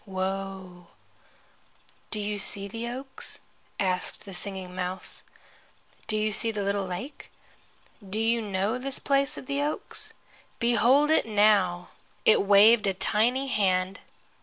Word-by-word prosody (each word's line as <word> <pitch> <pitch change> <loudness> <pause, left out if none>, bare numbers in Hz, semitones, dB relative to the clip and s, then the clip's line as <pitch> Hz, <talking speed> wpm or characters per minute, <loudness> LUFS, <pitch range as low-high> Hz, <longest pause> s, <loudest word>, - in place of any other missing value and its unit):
Woe.' 190 -2 -5 1.2
"Do 215 - -2
you 205 0 -2
see 200 0 0
the 230 +3 -5
oaks?" 260 +3 -1 0.4
asked 185 0 -2
the 195 - -9
Singing 190 -1 -5
Mouse. 185 0 -1 0.9
"Do 215 - +1
you 215 0 0
see 225 +2 0
the 210 -2 -2
little 200 -1 -1
lake? 185 +11 -7 0.8
Do 210 +3 -1
you 230 +1 +2
know 205 +3 -1
this 270 +1 -4
place 275 0 +1
of - - -8
the 280 +2 -1
oaks? 295 +1 -3 0.4
Behold 240 +6 +4
it 315 - +3
now!" 205 -5 +3 0.4
It 220 - +6
waved 205 +2 +6
a 195 - 0
tiny 235 +7 +1
hand. 190 -4 +1
205 Hz, 135 wpm, -27 LUFS, 190-235 Hz, 1.2 s, It